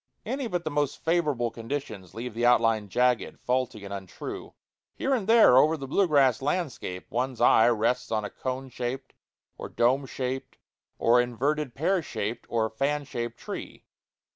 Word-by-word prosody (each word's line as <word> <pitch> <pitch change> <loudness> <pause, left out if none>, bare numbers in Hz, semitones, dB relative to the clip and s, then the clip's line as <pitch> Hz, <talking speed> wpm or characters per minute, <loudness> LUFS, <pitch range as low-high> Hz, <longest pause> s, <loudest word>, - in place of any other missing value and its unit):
Any 270 -2 -2
but 175 -5 -2
the 155 - -3
most 145 -1 0
favorable 150 -8 +1
conditions 115 -7 -6
leave 120 +1 -5
the 115 +2 -3
outline 115 -3 +3
jagged, 125 +3 +1
faulty, 125 -5 -1
and 100 - -6
untrue. 95 -2 -7 0.4
Here 270 - 0
and 220 -7 -1
there 225 - +7
over 155 +3 +4
the 135 -2 -7
blue 190 +8 +2
grass 135 -6 +3
landscape 140 - -3
one's 125 0 -2
eye 110 - +6
rests 120 +2 0
on 110 -1 0
a - - -6
cone 130 +1 -4
shaped, 125 +2 -5 0.5
or - - -6
dome 130 +3 +2
shaped, 130 +1 -4 0.4
or 120 +1 +4
inverted 130 +3 -1
pear 180 +5 +1
shaped, 115 -4 -4
or 115 -1 +1
fan 140 +6 -1
shaped 120 -3 -5
tree. - - -8
125 Hz, 165 wpm, -27 LUFS, 115-145 Hz, 0.5 s, there